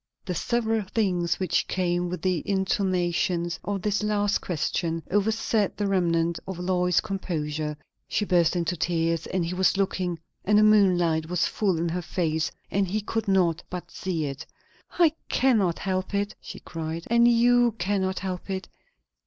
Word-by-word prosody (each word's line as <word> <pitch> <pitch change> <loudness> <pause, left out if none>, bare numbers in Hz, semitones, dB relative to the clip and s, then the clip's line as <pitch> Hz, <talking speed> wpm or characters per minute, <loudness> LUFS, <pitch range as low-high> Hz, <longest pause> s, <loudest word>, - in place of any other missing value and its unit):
The 185 - -2
several 225 +3 0
things 185 -4 0
which 185 -3 0
came 175 -1 0
with 180 - -5
the 185 -3 +1
intonations 180 -3 0
of 200 -2 -3
this 210 0 +1
last 205 -1 +1
question 165 0 -2
overset 215 0 +1
the 205 - -1
remnant 170 -3 +1
of 190 -2 -5
Lois's 180 -1 +1
composure. 155 -7 -3 0.3
She 210 - 0
burst 175 -3 +3
into 175 0 0
tears; 165 -1 0
and 185 -2 -1
he 170 - -3
was 190 +1 +2
looking, 185 -3 -1 0.3
and 210 +1 +3
the 210 - +6
moonlight 175 -7 +4
was 180 -2 +1
full 195 -5 0
in 170 +1 -1
her 180 +2 -2
face, 160 -2 -1 0.2
and 195 0 +1
he 210 +4 -1
could 225 +1 -3
not 180 -4 +2
but 180 -1 -6
see 170 -5 -2
it. 140 -1 -5 0.5
"I 335 -4 +5 0.2
cannot 220 -10 +2
help 185 +1 -2
it," 200 +1 -1
she - - -9
cried; 165 0 -5
"and 235 +1 +4
you 240 0 +4
cannot 190 0 0
help 185 0 -4
it. 190 -1 -3
185 Hz, 160 wpm, -26 LUFS, 170-205 Hz, 0.5 s, the